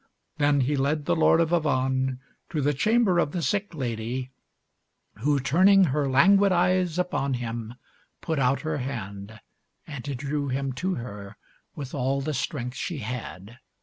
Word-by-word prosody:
Then 145 -1 +3
he 140 +4 +1
led 145 +2 0
the - - +2
Lord 160 0 +4
of 165 0 +1
Avannes 130 -5 +1 0.3
to 155 - -2
the 145 +1 +1
chamber 210 - +2
of 150 - 0
the 175 - -2
sick 205 -1 -1
lady, 125 0 -3 0.9
who, 145 +4 +2
turning 185 +10 +5
her 145 -3 +1
languid 195 +9 +5
eyes 180 -1 +2
upon 140 -7 0
him, 115 -1 -5 0.4
put 160 -3 -2
out 130 +1 +2
her 155 -2 -2
hand 110 -4 -6 0.5
and 140 -5 -7
drew 145 +2 -2
him 135 0 -2
to 185 +8 -2
her 105 -4 -8 0.4
with 140 -3 -7
all 135 0 0
the 150 +3 -3
strength 125 -2 -3
she 170 - -3
had. 115 -2 -7
140 Hz, 155 wpm, -26 LUFS, 125-160 Hz, 0.9 s, turning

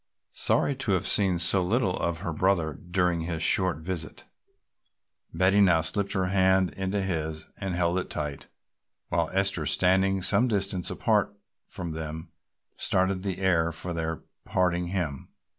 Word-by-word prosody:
Sorry 145 - +1
to 125 -7 0
have 95 +1 0
seen 95 -2 +3
so 90 +2 +4
little 95 -1 0
of 85 0 -2
her 85 -4 -3
brother 85 -2 +1
during 90 +1 -1
his 80 -1 -2
short 95 -4 +4
visit, 80 0 -6 1.1
Betty 95 +4 +3
now 90 -5 +4
slipped 100 +5 0
her 95 -2 0
hand 95 0 +2
into 95 +1 -2
his 80 -4 -3
and 95 -3 -4
held 90 +1 +1
it - - -6
tight 75 -2 -5 0.6
while 85 -2 0
Esther, 95 -5 0
standing 95 +4 +2
some 120 +6 +3
distance 100 -5 -1
apart - - 0 0.3
from 85 -2 -6
them, 80 0 -6 0.5
started 95 0 0
the 95 -2 -3
air 85 -4 +1
for 85 +2 -4
their 80 -1 -4 0.2
parting 90 -1 0
hymn. 85 -7 -3
90 Hz, 150 wpm, -27 LUFS, 85-95 Hz, 1.1 s, so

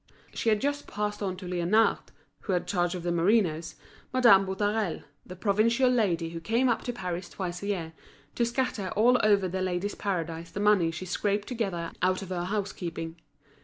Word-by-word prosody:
She 230 - 0
had 215 -1 +3
just 285 +2 -2
passed 210 0 -3
on 190 -2 -2
to 185 - -9
Liénard, 180 +5 +2 0.4
who 195 - -3
had 180 - 0
charge 175 0 0
of 175 - -6
the 175 - 0
merinoes, 170 -2 +1 0.4
Madame 235 -7 +6
Boutarel, 205 0 -1 0.2
that 185 - -8
provincial 230 +5 +3
lady 180 -9 +1
who 165 - -5
came 230 +9 +1
up 235 - +1
to 245 - -1
Paris 180 -5 -5
twice 175 -2 -5
a 200 - -4
year, 170 -5 -2 0.4
to 240 - 0
scatter 235 -5 -1
all 245 +4 +5
over 200 -3 +3
The 185 +1 -3
Ladies' 185 +2 -1
Paradise 170 -4 -3
the - - -6
money 205 -5 +4
she 170 +3 -6
scraped 205 +2 -1
together 195 -9 -3
out 185 +2 +1
of 190 - -9
her 175 -1 -2
house 205 +1 -2
keeping. 165 -2 -5
195 Hz, 190 wpm, -28 LUFS, 175-215 Hz, 0.4 s, Madame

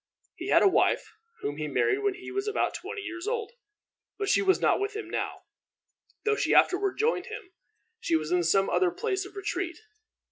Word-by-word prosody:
He - - -7
had - - +5
a - - +7
wife, 385 - +2 0.3
whom 145 - -3
he 155 0 -3
married 395 - +1
when 405 -2 0
he 365 +1 -9
was 395 +2 -2
about 420 - 0
twenty 415 +2 -6
years 350 +1 -6
old; 455 -1 -2 0.7
but 405 -1 -2
she - - +4
was 380 -1 +3
not - - +3
with 405 +1 -2
him 430 -4 -5
now, - - -4 0.8
though 435 0 +3
she - - +1
afterward 385 +1 +4
joined 455 +3 +1
him. 400 -7 -8 0.5
She 165 - 0
was 155 0 -1
in 180 0 +3
some 195 +4 +3
other 370 - +2
place 385 +1 -2
of 395 - -17
retreat. 375 -3 -3
390 Hz, 200 wpm, -28 LUFS, 350-420 Hz, 0.8 s, a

